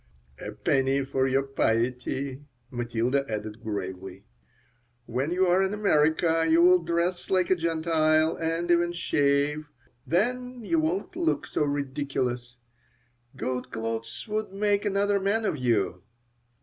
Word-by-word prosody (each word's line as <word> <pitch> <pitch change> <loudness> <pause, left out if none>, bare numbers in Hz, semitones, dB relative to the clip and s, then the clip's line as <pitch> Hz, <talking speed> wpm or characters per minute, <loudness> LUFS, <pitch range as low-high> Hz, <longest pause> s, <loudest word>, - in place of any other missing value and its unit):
"A - - -6
penny 135 0 +1
for 130 0 0
your 135 +1 +2
piety," 130 +1 -1 0.3
Matilda 120 +2 0
added, 105 +1 -5
gravely. 95 -2 -6 0.8
"When 130 +5 -2
you 185 +2 +2
are 180 +1 +3
in 195 +2 0
America 165 -4 +2
you'll 175 +3 +6
dress 170 +2 -1
like 185 -1 +2
a - - +6
Gentile 160 -1 +2
and 165 +1 -1
even 175 0 +3
shave. 145 -2 +1 0.4
Then 250 +7 -1
you 330 +6 +2
won't 330 +3 -2
look 335 -4 0
so - - -1
ridiculous. 135 -4 -3 0.8
Good 130 -1 -3
clothes 115 0 -4
would 215 -1 -2
make 205 +1 0
another 200 0 +1
man 205 +3 0
of - - 0
you." 105 -7 0
155 Hz, 125 wpm, -27 LUFS, 125-185 Hz, 0.8 s, you'll